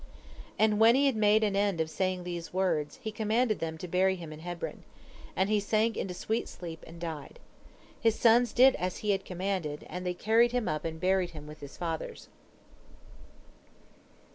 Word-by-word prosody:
And 215 -1 +3
when 225 +2 +7
he 280 +1 +4
had 270 -4 +3
made 215 0 +4
an 205 -2 +1
end 200 -3 +1
of 160 - +1
saying 185 +2 -2
these 175 -1 -5
words, 180 - 0
he 220 - -3
commanded 220 +1 +1
them 160 -1 -3
to 180 - -7
bury 190 +2 +2
him 165 -4 -8
in 155 - -10
Hebron. 175 +1 -6 0.5
And 190 - +2
he 210 0 +2
sank 215 +2 +1
into 180 -2 -3
sweet 220 +5 -2
sleep, 165 -2 -8
and 165 +1 -11
died. 160 -4 -6 0.6
His 225 -1 +2
sons 235 0 +5
did 260 +2 +6
as 180 0 -2
he 210 - +3
had 195 -1 0
commanded, 180 -5 -3
and 180 0 -6
they 180 -1 -2
carried 230 +5 +3
him 245 -3 0
up 155 +1 -2
and 160 0 -4
buried 185 0 +2
him 150 - -9
with 150 0 -11
his 140 -1 -10
fathers. 165 -2 -5
190 Hz, 190 wpm, -30 LUFS, 170-220 Hz, 0.6 s, when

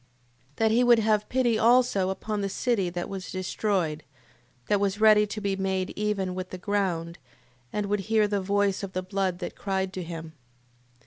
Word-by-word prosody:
That 220 -1 +2
he 240 +3 +4
would 240 -1 +6
have 215 -1 +1
pity 240 -4 +2
also 235 -5 +4
upon 210 +2 -3
the 200 - -1
city 205 -4 0
that 175 0 -4
was 190 -2 -6
destroyed, 185 -4 -1 0.6
that 205 - +2
was 200 0 0
ready 215 -1 +6
to 215 - -5
be 200 -2 -1
made 190 -1 -1
even 205 -3 -2
with 185 0 -5
the 185 - -6
ground, 180 -4 -2 0.5
and 210 -1 -2
would 205 +1 0
hear 220 -2 +4
the 205 -1 -1
voice 200 0 +1
of 195 -2 -6
the 185 - -2
blood 190 -1 -1
that 180 - -6
cried 190 -1 -2
to 185 - -4
him: 165 -1 -6
8:4. - - -17
195 Hz, 190 wpm, -27 LUFS, 185-210 Hz, 0.6 s, would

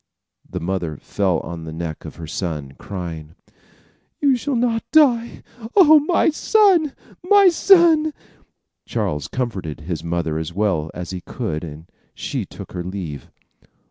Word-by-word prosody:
The - - -4
mother 85 -4 -3
fell 95 +1 -1
on 85 -1 -7
the 80 - -7
neck 80 -1 -6
of - - -8
her 85 - -8
son, 80 -5 -4
crying: 85 -5 -7 0.8
"You 280 -3 +4
shall 265 +3 -2
not 230 -1 +1
die! 245 -7 +3 0.3
Oh, 315 -6 +8
my 325 +2 +2
son! 360 -4 +3 0.3
my 395 +1 +6
son!" 335 -3 +5 0.8
Charles 75 0 -2
comforted 95 - -4
his 80 0 -5
mother 85 -2 -2
as 80 +1 -5
well 95 -6 0
as 90 0 -6
he 90 -1 -5
could, 80 -1 -4
and 80 0 -9 0.3
she - - -4
took - - -10
her 90 -1 -4
leave. 90 -6 -6
90 Hz, 140 wpm, -21 LUFS, -, 0.8 s, Oh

